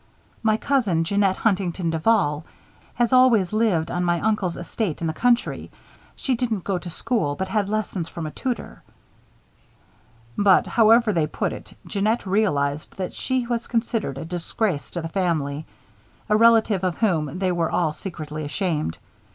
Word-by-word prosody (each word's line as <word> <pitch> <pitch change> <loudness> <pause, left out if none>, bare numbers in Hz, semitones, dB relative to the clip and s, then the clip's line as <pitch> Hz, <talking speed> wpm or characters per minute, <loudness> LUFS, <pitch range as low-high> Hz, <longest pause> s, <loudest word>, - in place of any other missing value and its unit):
"My 220 -1 +2
cousin, 220 -12 +1
Jeanette 195 +2 +2
Huntington 185 -5 0
Duval, 160 -3 +2 0.5
has 240 0 +1
always 235 -7 +5
lived 200 -8 +1
on 180 - -1
my 175 -1 +1
uncle's 205 -4 0
estate 175 0 -3
in 170 - -3
the 160 - -1
country. 245 +5 +1 0.5
She 265 - -1
didn't 230 -6 -1
go 190 -3 -1
to 175 - -8
school, 160 - -1
but 190 - -3
had 205 -2 0
lessons 205 -5 -2
from 170 -3 -6
a 155 - -4
tutor." 250 - -4 1.5
But, 200 -2 +4
however 225 -1 +4
they 160 -3 +1
put - - -2
it, - - -11
Jeannette 215 +3 0
realized 155 -8 0
that 185 -2 -4
she 260 -2 -1
was 235 -1 -2
considered 225 - -1
a 150 - -5
disgrace 175 0 -2
to 170 - -5
the - - -2
family, 160 -5 -1 0.6
a 210 - +4
relative 225 -3 +4
of 180 -3 -1
whom 165 -7 0
they 185 -1 0
were 170 -2 0
all 160 -4 0
secretly 155 -4 -6
ashamed. 150 - -2
190 Hz, 160 wpm, -23 LUFS, 165-220 Hz, 1.5 s, always